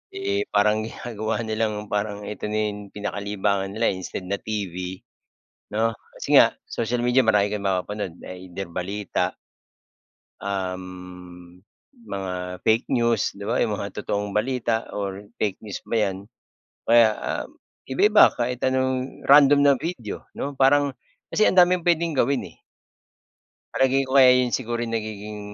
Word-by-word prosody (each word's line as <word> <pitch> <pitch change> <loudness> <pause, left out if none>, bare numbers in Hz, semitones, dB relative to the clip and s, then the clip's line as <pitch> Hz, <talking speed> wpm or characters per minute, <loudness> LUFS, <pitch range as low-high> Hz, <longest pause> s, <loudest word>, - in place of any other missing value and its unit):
Eh, 395 +1 -1
parang 105 +1 +3
ginagawa 115 -1 -4
nilang 110 -1 -2
parang 105 0 -2
ito 105 0 -5
na 105 - -1
yung 105 -1 -9
pinakalibangan 100 -1 -2
nila, 115 +1 +2
eh, - - -4
instead 95 - -6
na 100 +2 -2
TV, 95 -3 -5 0.7
'no? 115 +1 +1 0.2
Kasi - - +1
nga - - +7 0.2
social 120 +1 -2
media 125 +2 +3
marami 105 -2 +4
kang 105 -1 -4
mapapanood, 95 -1 -2
either 90 +1 -7
balita 95 +4 -2 1.1
um, 90 -2 -6 0.5
mga 90 -1 -5
fake 110 +2 +3
news, 115 -3 +1
'di 100 - -8
ba 115 - +1
yung 110 -3 +1
mga 100 0 -5
totoong 105 0 -2
balita 115 +1 0
or 100 0 -4
fake 105 -3 0
news 105 -2 -6
ba 115 - -2
'yan. 100 -3 0 0.7
Kaya, 115 -1 +6
ah, - - -3 0.4
iba-iba, 210 +11 +6
kahit 125 +1 -1
anong 130 0 -1
random 140 0 +7
na 140 - +7
video, 140 - -5
'no? 140 - -3
Parang 140 +1 +4 0.4
kasi 215 - +4
ang - - +1
daming 180 0 +6
puwedeng 170 -1 +2
gawin, 135 +2 +2
eh. - - -22 1.2
Palagay 135 +1 +3
ko 135 +1 +3
kaya 130 -1 +8
'yon 125 -1 +1
siguro 120 -2 -2
nagiging, 105 -2 -5
105 Hz, 145 wpm, -24 LUFS, 100-125 Hz, 1.2 s, kaya